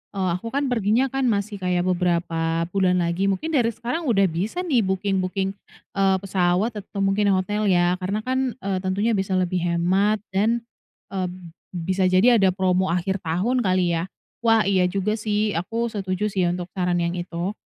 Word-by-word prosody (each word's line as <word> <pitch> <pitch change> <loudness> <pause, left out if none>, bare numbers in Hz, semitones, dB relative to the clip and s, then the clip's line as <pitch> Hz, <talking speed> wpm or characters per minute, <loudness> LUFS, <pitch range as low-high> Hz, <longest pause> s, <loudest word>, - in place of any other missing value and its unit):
eee, 190 -2 0
aku 230 - -8
kan 275 +2 -1
perginya 235 +3 +1
kan 270 -1 0
masih 205 -2 -1
kayak 180 -1 0
beberapa 170 -2 0
bulan 180 -2 +2
lagi, 170 +3 0
mungkin 195 +12 -1
dari 255 -7 +3
sekarang 240 +8 -3
udah 205 -5 +3
bisa 205 - -2
nih 295 -9 +2
booking-booking, 190 -1 -1 0.4
eee, 195 -1 +2
pesawat 190 +3 +1
atau 200 0 -4
mungkin 195 0 +2
hotel 205 +3 -1
ya, 180 -1 +2
karena 200 +4 -2
kan, 260 0 -1
eee, 195 -1 -1
tentunya 195 +5 0
bisa 190 -2 0
lebih 185 0 0
hemat 185 +5 +1
dan, 225 +5 +1 0.5
eee, 185 -2 -1 0.5
bisa 185 +2 0
jadi 210 +6 +5
ada 190 -2 +3
promo 185 0 +1
akhir 180 +3 -1
tahun 185 +11 0
kali 185 -5 +1
ya? 170 +1 -1 0.3
Wah, 225 -2 +4
iya 185 -2 +2
juga 200 +4 -1
sih 210 0 0
aku 225 +7 -2
setuju 200 0 -2
sih 185 -3 +1
ya 175 - 0
untuk 180 0 -6
saran 180 -2 0
yang 170 - 0
itu. 175 +1 -3
190 Hz, 175 wpm, -23 LUFS, 180-215 Hz, 0.5 s, jadi